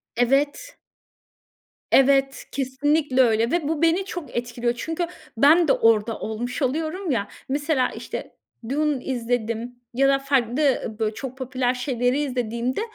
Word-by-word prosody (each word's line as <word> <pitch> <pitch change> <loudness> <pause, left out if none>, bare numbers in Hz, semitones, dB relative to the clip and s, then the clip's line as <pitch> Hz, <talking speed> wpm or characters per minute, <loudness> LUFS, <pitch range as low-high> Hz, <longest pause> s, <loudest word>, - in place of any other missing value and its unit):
Evet. 280 - +1 1.1
Evet, 270 0 +4
kesinlikle 275 +1 +1
öyle 230 0 +3
ve 335 -4 0
bu 320 0 -1
beni 335 +4 +3
çok 355 -6 -7
etkiliyor 240 0 -1
çünkü 325 +6 -2 0.3
ben 315 +6 +6
de - - +5
orada 225 0 +2
olmuş 240 +7 -4
oluyorum 315 +6 -1
ya 210 -5 0 0.2
mesela, 285 -1 +1
işte, - - -7 0.3
Dune 295 -1 0
izledim 240 -1 -2 0.2
ya 275 +3 +3
da 275 0 +3
farklı 270 -3 +1
böy 220 -1 +1
çok 260 +2 -7
popüler 255 -1 -1
şeyleri 250 +1 0
izlediğimde 245 - -2
260 Hz, 130 wpm, -23 LUFS, 240-295 Hz, 1.1 s, ben